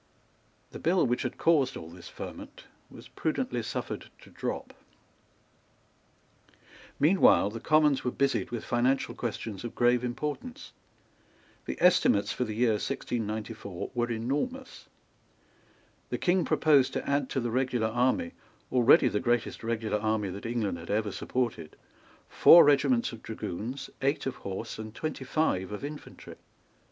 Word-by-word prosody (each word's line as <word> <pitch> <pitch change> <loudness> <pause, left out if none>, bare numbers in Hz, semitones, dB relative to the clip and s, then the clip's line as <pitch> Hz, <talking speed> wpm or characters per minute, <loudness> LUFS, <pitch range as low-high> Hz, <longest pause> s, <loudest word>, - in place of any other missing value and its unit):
The - - -8
bill 175 +2 +2
which 120 -1 0
had - - -4
caused 140 -6 +2
all 80 +1 -9
this 90 0 -12
ferment - - -9 0.3
was - - -13
prudently - - -2
suffered - - -5
to - - -16
drop. - - -5 2.3
Meanwhile 155 - +5
the 115 - -6
Commons 150 0 +3
were 125 - 0
busied 140 +2 0
with 120 -2 -5
financial 125 +3 +1
questions 110 -4 -5
of 120 - -6
grave 120 0 +3
importance. 150 - -5 0.9
The - - -4
estimates 175 - +4
for 125 - -1
the 110 -2 -5
year 120 0 +3
1694 110 -7 -4
were 120 -1 -1
enormous. 145 - -3 1.2
The - - -2
King 180 0 +1
proposed 145 -4 +3
to - - -3
add 140 -1 0
to - - -1
the 120 -2 -2
regular 125 -3 0
army, 130 - +1 0.4
already 125 +1 +6
the 105 - 0
greatest 120 0 -1
regular 110 -2 -1
army 110 -2 -1
that 100 +4 -6
England 110 -7 -2
had - - -11
ever 105 0 0
supported, 115 -9 -3 0.5
four 170 - +8
regiments 140 -4 +3
of 115 -2 -10
dragoons, 115 +5 -6
eight 140 +2 0
of 135 -1 -3
horse, 95 +2 -6
and 110 0 -8
twenty 155 -4 -4
five 105 -11 0
of 105 +7 -5
infantry. 150 +1 -10
120 Hz, 140 wpm, -29 LUFS, 110-140 Hz, 2.3 s, four